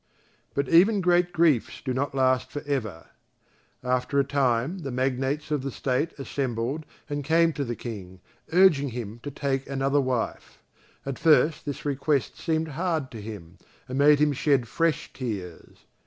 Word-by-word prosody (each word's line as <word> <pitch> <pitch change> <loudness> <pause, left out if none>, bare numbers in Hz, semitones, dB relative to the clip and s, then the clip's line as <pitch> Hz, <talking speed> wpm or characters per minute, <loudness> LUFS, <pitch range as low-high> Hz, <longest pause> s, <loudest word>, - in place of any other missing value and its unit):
But 140 -1 0
even 195 +8 +5
great 175 -1 +3
griefs 160 -8 +2
do 130 - -3
not 135 +2 -2
last 130 -1 +2
for 145 +2 -5
ever. 110 - -3 0.7
After 125 +2 0
a - - +4
time 135 +4 0
the 140 -5 -5
magnates 135 +4 -1
of 150 -3 +1
the 135 - -3
State 135 +5 -2
assembled 135 +1 -3 0.2
and 145 -1 -3
came 165 +2 +3
to 145 - -2
the 120 -2 -3
King, 95 -7 -8 0.3
urging 160 -6 +5
him 115 -2 -6
to 145 - -5
take 135 -1 -2
another 135 +1 +1
wife. 130 -3 -3 0.5
At 135 -1 -4
first 160 -1 +4
this 145 -1 -5
request 140 0 0
seemed 160 0 -1
hard 160 -2 -2
to 115 -3 -8
him 95 -5 -9 0.3
and 130 +1 -3
made 145 +1 +6
him 150 0 +3
shed 135 -3 +1
fresh 165 +4 -1
tears. 100 -9 -7
140 Hz, 160 wpm, -26 LUFS, 125-150 Hz, 0.7 s, made